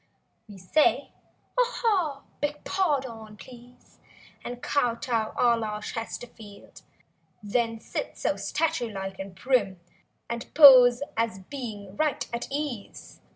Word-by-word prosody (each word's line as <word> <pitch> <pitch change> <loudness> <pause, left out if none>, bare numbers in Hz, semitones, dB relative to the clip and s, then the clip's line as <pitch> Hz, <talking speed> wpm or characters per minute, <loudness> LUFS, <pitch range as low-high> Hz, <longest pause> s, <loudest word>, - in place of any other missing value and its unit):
We 205 - -11
say 190 +12 +2 0.5
"Ah - - +7
ha!" 360 - 0 0.2
"Beg 295 0 -3
pah 315 -8 +1
done, 225 -4 -10
please!" 245 0 -16 0.4
And 245 0 -6
kow 245 -5 +1
tow 230 -2 -2
a 240 -1 +4
la 215 -2 -3
Chesterfield. 225 -2 -8 0.6
Then, 230 +2 -1
sit - - -5
so - - 0
statue 320 -7 -1
like 195 -2 -6
and 195 -1 -7
prim. 205 -8 0 0.5
And 235 0 -6
pose 255 -4 +9
as 225 -3 -1
being 210 -8 -7
right 305 -2 0
at 235 - -3
ease. 280 -7 -6
240 Hz, 125 wpm, -26 LUFS, 215-280 Hz, 0.6 s, pose